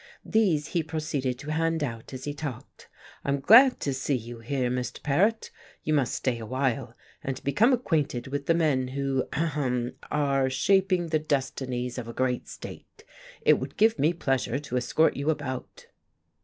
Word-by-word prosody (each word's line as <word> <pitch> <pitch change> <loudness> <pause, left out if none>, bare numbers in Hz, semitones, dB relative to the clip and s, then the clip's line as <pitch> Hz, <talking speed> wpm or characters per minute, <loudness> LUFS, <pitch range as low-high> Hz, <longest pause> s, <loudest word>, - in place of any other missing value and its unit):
These 180 -10 +2
he 170 - +1
proceeded 150 -5 -2
to 145 +4 -6
hand 165 0 0
out 115 -4 -5
as 130 -1 -7
he 145 - -3
talked. 145 -5 -8 0.3
"I'm 140 0 0
glad 250 - +7
to 140 - -1
see 135 +2 -1
you 120 -1 -6
here, 125 +1 -1
Mr. 125 -1 -4
Paret. 205 +11 +1 0.3
You 155 - 0
must 135 -5 +1
stay 125 -3 -1
awhile, 130 +2 -2 0.3
and 135 -1 -4
become 205 - +3
acquainted 160 - 0
with 140 +1 -4
the 165 - +4
men 145 -6 +2
who 135 0 -1
ahem 135 -6 -1 0.2
are 140 -3 +1
shaping 185 +5 +2
the 155 -1 +2
destinies 130 -4 -2
of 115 - -6
a 115 - -6
great 125 0 -1
state. 435 - -10 0.4
It - - +5
would - - -7
give 220 +2 +4
me 155 +3 +4
pleasure 135 -6 -1
to 140 -3 -5
escort 130 +6 +2
you 140 +3 -1
about." 140 -5 -4
140 Hz, 170 wpm, -27 LUFS, 130-160 Hz, 0.4 s, glad